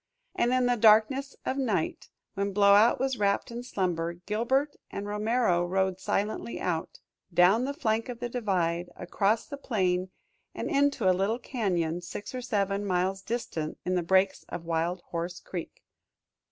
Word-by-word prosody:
And 240 - +1
in 255 0 +3
the 245 0 +2
darkness 230 +6 +4
of 265 - -1
night, 215 -11 -1 0.2
when 200 0 -2
Blowout 205 +3 +5
was 265 -2 -1
wrapped 200 +2 +1
in 235 +1 -5
slumber, 175 -8 -2
Gilbert 235 +11 -1
and 200 - -5
Romero 210 -3 +1
rode 190 +1 0
silently 210 +4 -2
out, 165 -3 -2 0.3
down 185 +8 +4
the 280 - -2
flank 225 -5 0
of 240 -1 -6
the 245 - -2
divide, 180 -8 -1
across 200 +5 0
the 285 - -7
plain 185 -8 0 0.5
and - - -3
into 280 -7 +2
a 185 - +6
little 195 +5 0
cañon 180 -9 -1
six 185 +6 -7
or 255 - -4
seven 205 -4 -1
miles 190 0 0
distant 190 -8 -4
in 185 - 0
the 180 - +2
breaks 190 +3 +2
of 170 -1 -6
Wild 170 +2 -1
Horse 170 +1 -3
Creek. 175 -3 -7
200 Hz, 160 wpm, -28 LUFS, 180-235 Hz, 0.5 s, a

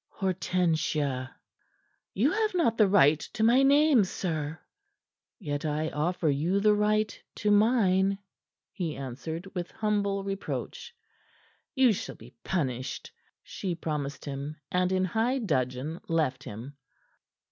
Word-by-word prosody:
Hortensia!" 160 -8 0 0.9
"You 250 +10 +3
have 430 -1 0
not 310 -11 +2
the 215 -3 +5
right 155 -6 +5
to 225 - -1
my 240 +4 +5
name, 280 -3 +5
sir." 160 -5 -3 0.8
"Yet 145 -6 -4
I 155 +1 -1
offer 165 +2 -1
you 155 +7 +1
the 210 +1 +4
right 210 +1 +1 0.2
to 210 - 0
mine," 200 -3 +3 0.5
he 170 -6 -3
answered, 140 +7 -6
with 180 -2 -4
humble 200 -2 -1
reproach. 195 - -5 0.8
"You 260 -4 +5
shall - - -5
be - - -15
punished," 130 -8 -3 0.3
she 180 -3 -4
promised 150 -4 -4
him, 140 +1 -5 0.2
and 180 0 +1
in 185 0 +2
high 225 +8 0
dudgeon 145 - -2
left 150 -5 0
him. 120 +7 -8
180 Hz, 125 wpm, -28 LUFS, 150-210 Hz, 0.9 s, the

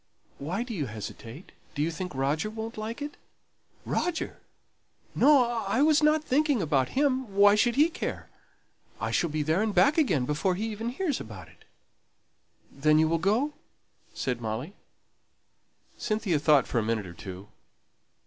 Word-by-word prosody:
Why 180 +11 -2
do 245 -1 -7
you 150 -9 -2
hesitate? 115 - -9 0.2
Do 145 - 0
you 165 - 0
think 180 -2 -6
Roger 145 +9 0
won't 220 +1 -6
like 225 +5 -5
it?" 290 0 -7 0.7
"Roger! 345 -2 -2 0.7
no, 285 -3 +5
I 235 +1 0
wasn't 305 0 +4
thinking 290 -1 +2
about 145 - 0
him! 260 -7 +1
Why 205 0 +7
should 235 +3 +2
he 295 +4 +5
care? 335 - -5 0.7
I - - -2
shall 170 - +1
be 150 0 -1
there 160 +6 +1
and 215 -1 -1
back 195 - +4
again 165 - +2
before 150 +7 0
he 210 +4 -3
even 225 +2 -4
hears 290 +2 -2
about 95 -7 -10
it." - - -22 1.1
"Then 155 +2 +3
you 160 0 +4
will 165 +1 +1
go?" 225 - +1 0.6
said 125 -2 -3
Molly. 115 - -4 1.3
Cynthia 210 -7 0
thought 145 -3 +4
for 120 - -1
a - - -1
minute 110 -2 -1
or 85 - -9
two. 95 +2 -9
190 Hz, 160 wpm, -28 LUFS, -, 1.3 s, Why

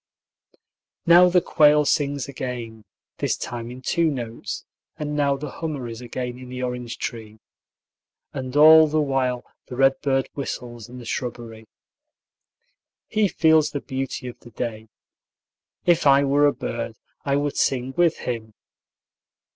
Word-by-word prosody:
Now 175 +2 +7
the 180 0 +4
quail 150 0 +4
sings 140 -2 0
again, 120 -5 -6 0.3
this - - 0
time 120 -1 -6
in 125 +1 -10
two 170 +2 +2
notes, 120 -5 -5 0.3
and 150 -1 -3
now 140 -1 +2
the 145 0 -6
hummer 150 -6 -5
is 115 0 -7
again 125 0 -5
in 130 -1 -10
the 125 0 -5
orange 125 -1 -4
tree. 110 -2 -6 1.0
And 130 0 -5
all 155 +1 +8
the 155 +1 0
while 130 -4 0 0.2
the 125 - -7
redbird 135 0 +2
whistles 120 -4 -6
in 125 - -10
the 120 - -10
shrubbery. 115 -2 -5 1.4
He 215 -1 +1
feels 160 -4 +3
the 145 - -4
beauty 135 0 -4
of 120 - -9
the 120 - -14
day. 110 -1 -5 1.0
If 170 -4 +3
I 140 0 +6
were 145 +1 +4
a - - +4
bird, 115 -1 -5 0.3
I 140 -1 +1
would 145 0 -1
sing 130 0 0
with 175 -2 +3
him. 110 -3 -4
130 Hz, 145 wpm, -23 LUFS, 120-145 Hz, 1.4 s, all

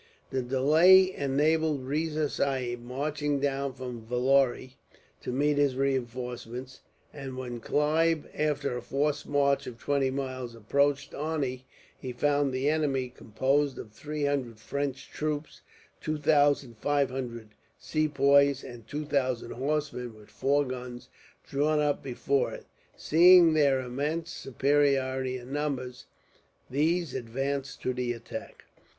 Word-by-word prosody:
The 130 - 0
delay 160 +9 +5
enabled 150 +1 +1
Riza 155 +2 0
Sahib, 130 -4 -2
marching 145 +3 -2
down 140 -1 -1
from 125 -3 -7
Vellore, 130 +2 +1 0.5
to - - -4
meet 145 +3 +1
his 140 -3 +2
reinforcements; 125 -1 -3 0.3
and 135 -3 -7
when 125 -2 -5
Clive, 155 +5 +1
after 145 -3 -1
a 125 - -4
forced 145 +4 -1
march 140 -1 +2
of 120 - -7
twenty 140 +2 0
miles, 130 -3 -4
approached 140 +5 0
Arni, 140 -4 -3 0.3
he 130 - -6
found 145 +2 +1
the 130 +2 -1
enemy, 145 -4 +1
composed 135 +5 0
of 105 - -8
three 150 +6 -4
hundred 135 -6 -1
French 140 +3 -4
troops, 150 0 -4 0.4
two 155 0 -2
thousand 145 -5 +2
five 145 -2 +1
hundred 120 -4 -5 0.3
Sepoys, 140 -2 +3
and 120 -3 -10
two 150 +4 -4
thousand 130 -4 -1
horsemen, 135 -3 -2
with 105 -1 -16
four 145 +1 +1
guns, 125 -1 -7 0.4
drawn 150 +2 +1
up 150 -1 +1
before 135 +1 0
it. - - -9 0.3
Seeing 170 +1 +7
their 140 -4 +3
immense 145 +7 -3
superiority 135 -1 +1
in 125 +2 -9
numbers, 135 -4 -3 0.6
these 160 +2 +1
advanced 135 +3 -3
to 130 - 0
the 125 -1 -1
attack. 115 -1 -9
140 Hz, 130 wpm, -28 LUFS, 125-145 Hz, 0.6 s, Seeing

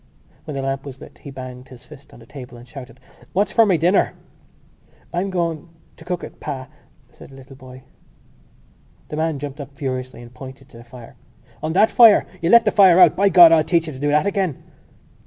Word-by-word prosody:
_ - - -33
When 150 - -6
the 135 - -4
lamp 135 0 -3
was 135 -2 -10
lit - - -15
he - - -11
banged 130 -1 -10
his 125 -1 -15
fist 140 -2 -16
on - - -16
the 115 - -16
table 125 -1 -12
and 120 +1 -15
shouted: 130 -3 -12 0.3
"What's 200 +4 0
for 225 -2 +4
my 185 -4 +2
dinner?" 175 +5 +1 1.0
"I'm 180 +3 -2
going... 170 -3 -3 0.3
to - - -16
cook 180 -1 -5
it, - - -11
pa," 130 -1 -7 0.4
said - - -16
the 135 - -15
little 135 0 -15
boy. 130 -1 -14 1.3
The 150 - -6
man 160 -1 -1
jumped 145 +1 -7
up 140 0 -12
furiously 130 -3 -6
and 120 +1 -15
pointed 135 +1 -12
to - - -16
the 120 - -13
fire. 120 -1 -15 0.4
"On 155 +1 -3
that 210 +5 +3
fire! 230 -4 +6 0.2
You 165 - -1
let 235 +2 +6
the - - +2
fire 190 -4 +5
out! 175 -4 +6
By 200 +1 +2
God, 175 -2 +8
I'll 160 -1 +4
teach 165 +1 0
you 155 - -7
to 130 - -11
do 145 - -2
that 150 +4 +1
again!" 195 -7 -2
145 Hz, 220 wpm, -20 LUFS, 130-175 Hz, 1.3 s, God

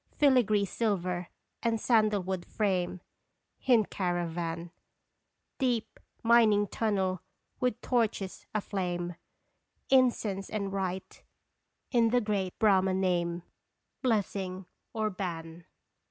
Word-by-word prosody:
Filigree 240 -8 +4
silver 185 -4 -1 0.3
and 230 -1 +1
sandal 215 -4 +3
wood 185 -1 -3
frame 185 -4 -1 0.6
Hint 235 -5 +3
caravan; 175 -2 -2 0.9
Deep 245 -5 -1 0.2
mining 225 -3 +5
tunnel 190 -5 0 0.4
with 250 -3 0
torches 220 -6 -1
aflame; 180 -4 -2 0.8
Incense 230 -7 +3
and 200 -2 -3
rite 190 -1 -3 0.7
in 235 -2 +4
the 245 +2 +3
great 205 -5 -2
Brahma 190 -3 +4
name, 175 -2 0 0.6
Blessing 195 -6 -1 0.3
or 215 -1 -1
ban. 170 -3 -6
195 Hz, 95 wpm, -30 LUFS, 180-220 Hz, 0.9 s, mining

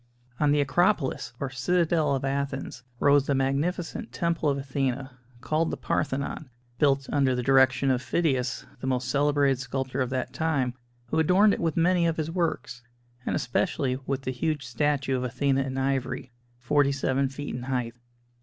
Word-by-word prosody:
On 150 -1 +3
the 145 0 +3
Acropolis, 165 +1 +1
or 135 -2 -3
Citadel 155 +2 +1
of 135 - -2
Athens, 135 -2 -3 0.2
rose 145 -1 +4
the 140 - +2
magnificent 160 - -1
Temple 170 -3 0
of 140 - 0
Athena, 135 -1 -2 0.3
called 155 +4 0
the - - -3
Parthenon, 140 0 -2 0.3
built 140 -2 +3
under 135 -3 +2
the 125 - -2
direction 130 0 +4
of 125 -1 +1
Phidias, 135 -5 0
the 130 - -5
most 130 -1 0
celebrated 140 -2 +2
sculptor 130 0 -3
of 130 - 0
that 130 -1 -3
time, 140 -6 0 0.4
who - - +1
adorned 190 +6 +5
it - - -2
with 165 -1 -1
many 170 0 +3
of 165 - -1
his 160 0 -2
works, 165 -8 -2 0.5
and - - +1
especially 130 0 0
with 135 -1 -2
the 130 - -2
huge 145 +2 -2
statue 135 +2 0
of 125 - -1
Athena 135 +2 +1
in 135 0 -3
ivory, 135 -1 -1 0.3
forty 140 +3 +2
seven 135 0 0
feet 145 +2 -6
in 125 - -4
height. 125 -2 -2
140 Hz, 170 wpm, -27 LUFS, 130-155 Hz, 0.5 s, adorned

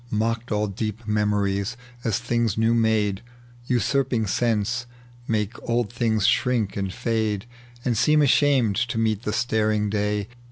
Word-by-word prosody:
Mocked 115 +2 -1
all 105 0 +1
deep 105 +2 -4
memories, 105 +1 0 0.3
as 110 -3 +1
things 120 -3 0
new 115 +1 +3
made, 110 -4 +1 0.5
Usurping 125 0 +1
sense, 120 +3 0 0.4
make 110 -1 0 0.2
old 120 -1 0
things 110 -3 +1
shrink 120 -6 +2
and 95 -2 -2
fade 110 -2 -1 0.4
And 120 -2 +1
seem 150 +7 +4
ashamed 135 -7 +3
to 120 -1 -1
meet 110 -2 +1
the 105 - -2
staring 110 -2 +1
day. 105 -1 -1
110 Hz, 135 wpm, -24 LUFS, 105-120 Hz, 0.5 s, seem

